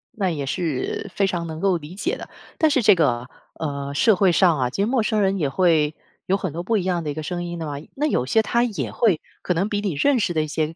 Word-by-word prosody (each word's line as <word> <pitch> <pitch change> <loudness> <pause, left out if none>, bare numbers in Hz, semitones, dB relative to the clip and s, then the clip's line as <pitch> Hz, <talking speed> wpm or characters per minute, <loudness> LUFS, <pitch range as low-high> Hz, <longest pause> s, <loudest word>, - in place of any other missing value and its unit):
那 195 -4 0
也 145 -4 -3
是 165 +5 -2
非 200 - +2
常 170 -3 -2
能 160 0 -6
够 190 -2 +2
理 160 +2 -10
解 200 - -1
的， - - -9 0.3
但 315 - +4
是 275 -4 +2
这 210 -1 +7
个， 125 -7 +1 0.3
呃， 140 -2 -4
社 215 +8 +4
会 185 -1 +4
上 170 -5 +4
啊， 125 - +1
其 195 - -3
实 - - +3
陌 245 +1 +1
生 215 0 +1
人 195 0 +2
也 145 -4 +1
会 160 -3 +2 0.3
有 195 +2 +2
很 185 -6 -4
多 170 - -3
不 225 +4 +1
一 190 - -1
样 175 -2 -1
的 150 - -3
一 - - -2
个 155 - -4
声 175 +2 -3
音 175 0 -5
的 165 - -4
嘛， 145 - -4 0.2
那 295 +2 0
有 195 - +1
些 220 +12 +3
他 235 +1 +1
也 230 -5 -2
会 205 -10 +2 0.2
可 180 - 0
能 190 +5 +1
比 205 -1 -1
你 195 -6 -1
认 265 - +2
识 185 -5 0
的 155 -1 +1
一 - - -4
些 155 +1 -2
175 Hz, 300 characters per minute, -23 LUFS, 155-205 Hz, 0.3 s, 这